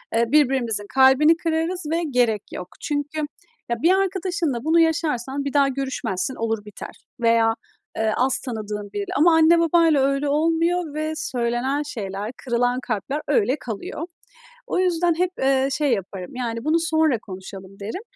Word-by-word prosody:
Eee, 235 +1 +3
birbirimizin 255 -8 +2
kalbini 270 +5 +6
kırarız 330 +2 -1
ve 340 +1 0
gerek 240 -5 +1
yok." 180 - -6
Çünkü, 290 +1 -3 0.5
ya, 235 -1 -2
bir 345 - +5
arkadaşınla 365 -9 0
bunu 325 +2 +3
yaşarsan 285 -5 0
bir 280 - -3
daha 280 -1 +4
görüşmezsin, 265 -5 -3
olur 225 -2 -2
biter 210 - -9 0.2
veya, 230 -1 +3 0.4
eee, 220 -1 +1
az 260 +1 +2
tanıdığın 210 -4 -5
biriyle. 400 -2 -4
Ama 330 +3 +5
anne 325 +1 +5
babayla 330 -3 +4
öyle 275 +1 +1
olmuyor 330 +2 +1
ve 310 +1 -2
söylenen 255 0 -1
şeyler, 205 -5 -5
kırılan 245 0 +1
kalpler 255 +5 -3
öyle 405 - +2
kalıyor. 225 +6 -6 0.7
O - - -1
yüzden 350 -2 +2
hep, 365 0 +1
eee, 265 0 +2
şey 290 -3 +1
yaparım. 190 +1 -5
Yani, 230 -2 -3
bunu 315 +2 +2
sonra 315 -6 +2
konuşalım 190 0 -10
derim. 220 - -5
270 Hz, 150 wpm, -23 LUFS, 230-320 Hz, 0.7 s, kalbini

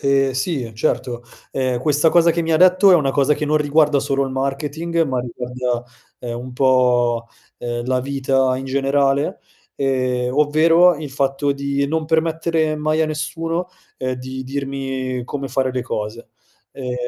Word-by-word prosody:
Ehm, 140 -1 +2
sì, 130 -3 -2
certo, 120 +2 -2 0.3
ehm, 130 -2 -1
questa 150 +3 +3
cosa 170 +1 +4
che 170 +1 0
mi 165 0 -1
ha 155 - +4
detto 185 +2 +6
è - - +8
una 145 -5 +3
cosa 140 +2 +2
che 150 - -3
non 150 +1 +1
riguarda 150 0 +3
solo 140 0 0
il 135 - -4
marketing, 145 +5 -1
ma 130 -3 -2
riguarda, 125 0 -3 0.4
ehm, 120 -1 -5
un 125 +1 -8
po', 125 -2 +2 0.3
ehm, 120 0 -4
la 130 0 0
vita 135 -1 0
in 130 - -5
generale, 140 +1 +1 0.3
ehm, 130 -2 0
ovvero 165 +4 +5
il 150 -2 -7
fatto 135 +1 0
di 140 0 -1
non 160 +1 -1
permettere 160 0 0
mai 155 +1 0
a 160 - +2
nessuno, 165 +3 -3 0.3
ehm, 130 0 -2
di 130 +1 -7
dirmi 135 -2 -3
come 140 +1 -5
fare 130 -1 0
le 125 -1 -2
cose. 110 -1 -5 0.4
Ehm, 125 -2 -5
135 Hz, 165 wpm, -20 LUFS, 130-155 Hz, 0.4 s, è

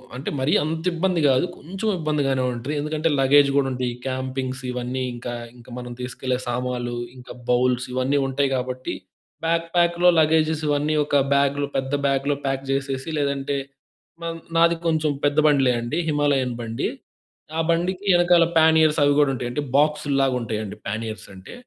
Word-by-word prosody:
అంటే 135 - -4
మరీ 135 +3 +1
అంత 160 +1 -3
ఇబ్బంది 175 -1 0
కాదు 130 +6 +3
కొంచెం 195 +8 -5
ఇబ్బందిగానే 140 -4 0
ఉంటది. 120 +5 -4
ఎందుకంటే 155 +2 -1
లగేజ్ 140 +1 +5
కూడా 135 -1 +3
ఉంటుంది. 125 -1 -2 0.2
క్యాంపింగ్స్ 130 0 -3
ఇవన్నీ 125 +1 -3
ఇంకా 120 0 -6 0.2
ఇంకా 120 +1 -16
మనం 125 0 -7
తీసుకెళ్లే 125 0 -2
సామాన్లు 120 0 -2 0.2
ఇంకా 125 0 -11
బౌల్స్ 125 +1 +2
ఇవన్నీ 130 +3 +1
ఉంటాయి 135 0 0
కాబట్టి. 130 0 -3 0.5
బ్యాక్ 165 0 +1
ప్యాక్‌లో 175 +1 +3
లగేజెస్ 155 0 +2
ఇవన్నీ 145 +1 +1
ఒక 145 - -1 0.2
బ్యాగ్‌లో 140 0 +1
పెద్ద 135 +1 -2
బ్యాగ్‌లో 140 +1 +1
ప్యాక్ 135 0 -2
చేసేసి 135 +1 -2
లేదంటే 140 0 -1 1.0
నాది 170 0 +5
కొంచెం 155 -2 +1
పెద్ద 145 +1 +1
బండి‌లే 135 -4 +4
అండి. 120 +8 -3
హిమాలయన్ 140 -4 +1
బండి. 115 0 -2 0.7
ఆ - - +1
బండికి 180 +3 0
వెనకాల 175 -1 +5
పానియర్స్ 160 -1 +5
అవి 145 0 +4
కూడా 145 - +3
ఉంటాయి. 120 -1 -3
అంటే 150 - -2 0.2
బాక్స్‌ల్లాగా 145 -3 +2
ఉంటాయండి. 110 -3 -4
పానీయర్స్ 110 +1 -4
అంటే. 95 0 -12
140 Hz, 150 wpm, -23 LUFS, 125-155 Hz, 1.0 s, లగేజ్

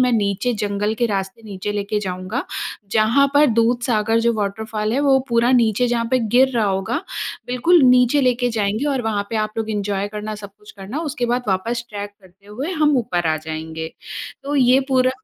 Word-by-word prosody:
मैं 250 0 +3
नीचे 210 +2 +1
जंगल 205 +1 -1
के 235 +1 +1
रास्ते 195 +2 -3
नीचे 205 -1 -5
लेके 205 +1 -2
जाऊँगा। 185 +5 -4 0.5
जहाँ 225 +6 +4
पर 295 +1 +6
दूधसागर 230 -2 +2
जो 235 +1 +2
वॉटरफॉल 215 +1 -2
है 265 - +1
वो 275 -2 +4
पूरा 235 +1 +3
नीचे 235 -1 +3
जहाँ 235 -1 0
पे 255 - +3
गिर 245 +3 +3
रहा 230 -2 +2
होगा, 195 +5 -1 0.5
बिल्कुल 275 +7 +3
नीचे 250 +2 +5
लेके 250 -1 +2
जाएँगे 215 +2 -1
और 265 -3 -1
वहाँ 215 -3 -1
पे 225 - -1
आप 215 0 -1
लोग 220 0 -2
एन्जॉय 205 -1 -2
करना, 210 +1 -5
सब 205 -1 -9
कुछ 210 - -14
करना 200 +9 -6
उसके 280 -6 -2
बाद 245 +1 0
वापस 230 +5 -1
ट्रेक 205 -1 -6
करते 190 +1 -22
हुए 250 - -5
हम 300 -4 +3
ऊपर 175 -7 -1
आ 155 - +2
जाएँगे। 160 +1 -6 0.5
तो 285 +1 -3
ये 255 0 +5
पूरा 255 -1 +3
220 Hz, 195 wpm, -20 LUFS, 205-250 Hz, 0.5 s, पर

